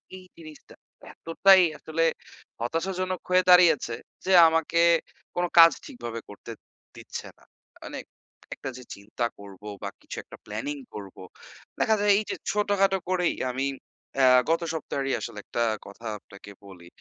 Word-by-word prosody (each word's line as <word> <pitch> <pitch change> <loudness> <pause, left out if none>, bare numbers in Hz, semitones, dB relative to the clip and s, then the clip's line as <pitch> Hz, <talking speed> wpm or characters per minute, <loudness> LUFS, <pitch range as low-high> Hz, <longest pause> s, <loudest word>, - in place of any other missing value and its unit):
এই 185 - -10 0.2
জিনিসটা 155 -2 -14 0.4
এতটাই 190 +3 +5 0.2
আসলে 165 +1 -2 0.6
হতাশাজনক 185 +8 -2
হয়ে 185 0 +4
দাঁড়িয়েছে 175 -9 +5 0.3
যে, 190 - 0 0.2
আমাকে 165 +1 +1 0.5
কোনো 175 0 0
কাজ 165 -1 +10
ঠিকভাবে 120 -2 -7
করতে 105 +3 -10 0.4
দিচ্ছে - - -8
না। - - -24 0.4
মানে - - -7 0.5
একটা 135 - -7
যে 125 - -10
চিন্তা 110 +4 -4
করবো 100 +1 -12 0.2
বা 100 - -3
কিছু - - -9
একটা - - -13
planning 125 +8 -5
করবো, 100 -3 -9 0.6
দেখা 220 - +3
যায় 205 0 +1
এইযে 215 - -4 0.2
ছোটখাটো 200 -2 +2
করেই 180 -2 +1 0.2
আমি 135 +2 -2 0.5
অ্যাঁ 130 -1 +6
গত 165 +1 +2
সপ্তাহেরই 140 -3 -3
আসলে 105 - -7
একটা 120 - -1 0.2
কথা 110 +3 -10
আপনাকে 100 +1 -14
বলি, 90 -3 -13
155 Hz, 140 wpm, -26 LUFS, 115-180 Hz, 0.6 s, কাজ